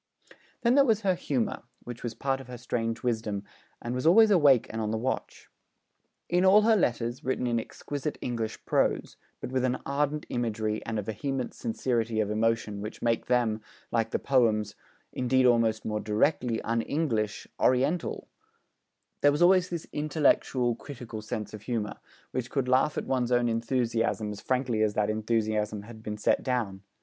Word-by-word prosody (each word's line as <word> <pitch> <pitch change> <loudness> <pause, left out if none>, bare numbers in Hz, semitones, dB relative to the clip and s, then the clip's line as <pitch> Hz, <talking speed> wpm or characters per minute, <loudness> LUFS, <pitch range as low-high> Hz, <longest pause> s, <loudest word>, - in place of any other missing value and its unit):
Then 235 0 +4
there 280 +1 +6
was 225 -5 +2
her 195 -3 +2
humour, 135 -9 -2 0.2
which 120 -1 -8
was 120 -2 -4
part 135 +2 -1
of 135 - -13
her 125 -1 -7
strange 115 -1 -3
wisdom, 110 -4 -1 0.4
and 120 - -4
was 125 +4 0
always 215 +5 +7
awake 145 - +5
and 110 - -3
on 105 - -1
the 110 - -1
watch. 130 +4 -3 0.8
In 180 +1 +2
all 200 +3 +7
her 225 0 +5
letters, 120 - 0
written 130 0 -1
in 120 -1 +1
exquisite 145 +5 -5
English 115 -3 -4
prose, - - +1 0.3
but - - -5
with 130 -1 0
an 130 0 +1
ardent 145 +2 -1
imagery 110 -3 -2
and 115 -1 -2
a 105 - -1
vehement 130 +5 -3
sincerity 115 -1 -1
of 105 -1 0
emotion 110 -2 0
which 105 +1 -7
make 115 -1 +1
them, 120 -3 +1 0.3
like 115 -1 +1
the - - 0
poems, 110 -6 +2 0.4
indeed 130 +1 +2
almost 115 -3 +3
more 105 -1 -1
directly, 115 +2 +1
un 115 0 0
English, 115 -8 -1
Oriental, 135 +7 +1 0.9
there 145 - +6
was 150 +4 +2
always 180 0 +5
this 170 -2 -4
intellectual, 145 -5 +2
critical 120 -3 -8
sense 110 0 -5
of 110 - -8
humour, 110 -2 -3 0.3
which 125 -1 -3
could 135 -3 -1
laugh 130 +4 +2
at - - -2
one's 125 -2 0
own 120 -1 +3
enthusiasm 115 -2 0
as 105 - -8
frankly 125 -4 0
as 105 -1 +1
that 105 0 +1
enthusiasm 110 -1 -1
had 110 0 -11
been 105 -1 -5
set 105 - +2
down. 115 -7 -2
120 Hz, 175 wpm, -28 LUFS, 110-135 Hz, 0.9 s, always